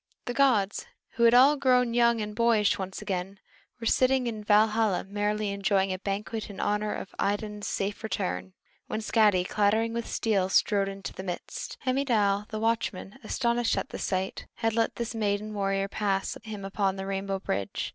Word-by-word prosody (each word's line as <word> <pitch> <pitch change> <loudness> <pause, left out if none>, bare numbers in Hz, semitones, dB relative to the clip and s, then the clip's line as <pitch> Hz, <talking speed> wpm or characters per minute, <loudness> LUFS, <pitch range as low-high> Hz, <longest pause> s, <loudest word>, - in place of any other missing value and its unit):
The 245 - -3
gods, 235 -8 +2 0.2
who 235 - -1
had 230 +1 +6
all 270 +4 +7
grown 250 -3 +3
young 235 -1 +3
and 210 0 -5
boyish 220 -4 +3
once 190 0 -5
again, 190 +1 -4 0.4
were 230 - -6
sitting 255 +2 +3
in 220 -3 -4
Valhalla 215 -1 +3
merrily 205 +1 -1
enjoying 195 -1 +1
a 185 - -5
banquet 210 +3 -4
in 200 - -9
honor 210 +1 0
of - - -7
Idun's 205 0 -2
safe 200 +2 -2
return, 195 -3 -3 0.3
when 215 - -3
Skadi, 210 -4 +3
clattering 220 +2 +1
with 235 0 -3
steel, 195 -4 0
strode 195 0 +2
into 195 0 -7
their 190 - -7
midst. 175 - -5
Heimdal 220 -7 +1
the 215 - -4
watchman, 225 -1 -2
astonished 235 -2 0
at - - -2
the - - -7
sight, 190 0 -2
had 225 -1 0
let 230 0 +1
this 235 0 -4
maiden 210 -1 -1
warrior 195 -1 0
pass 200 -1 -1
him 210 -3 -7
upon 195 -1 0
the 195 0 -5
rainbow 195 0 -2
bridge. 100 - -3
210 Hz, 175 wpm, -28 LUFS, 195-230 Hz, 0.4 s, all